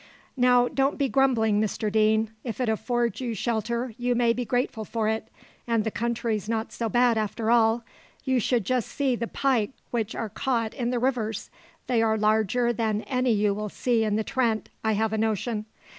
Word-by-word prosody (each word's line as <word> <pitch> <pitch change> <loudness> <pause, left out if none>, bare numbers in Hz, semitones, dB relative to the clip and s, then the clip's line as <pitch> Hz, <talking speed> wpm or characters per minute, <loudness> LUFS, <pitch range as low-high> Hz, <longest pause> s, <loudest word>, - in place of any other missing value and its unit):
"Now, 245 -1 +4
don't 270 +1 0
be 280 -1 +1
grumbling, 235 -6 +2
Mr 215 0 -1
Deane; 220 0 +2
if 235 -1 -5
it 250 - 0
affords 235 0 0
you 235 -3 -2
shelter, 235 +2 -2
you 245 0 +1
may 235 -1 +3
be 245 - -2
grateful 245 -2 -1
for 220 +1 -2
it: 220 0 -1 0.4
and 230 -2 +2
the 220 - -2
country's 230 -2 -2
not 225 0 -2
so 230 -1 -3
bad 240 0 +3
after 220 +1 -1
all. 230 0 +4 0.4
You 260 -2 +2
should 235 -1 +1
just 250 +1 0
see 275 -4 0
the 235 0 -3
pike 260 -3 0 0.2
which 230 -2 -2
are 225 - -3
caught 230 0 -1
in 240 -2 -2
the 250 - 0
rivers! 235 -4 -1 0.3
they 240 -3 +2
are 220 -1 +2
larger 220 +3 +2
than 220 -2 -1
any 255 -2 0
you 205 -1 +2
will 210 +1 -4
see 235 +1 +1
in 210 -1 0
the 220 - 0
Trent, 230 -3 0
I 220 0 +2
have 220 +1 0
a 220 - 0
notion. 220 0 -1
230 Hz, 195 wpm, -26 LUFS, 220-245 Hz, 0.4 s, Now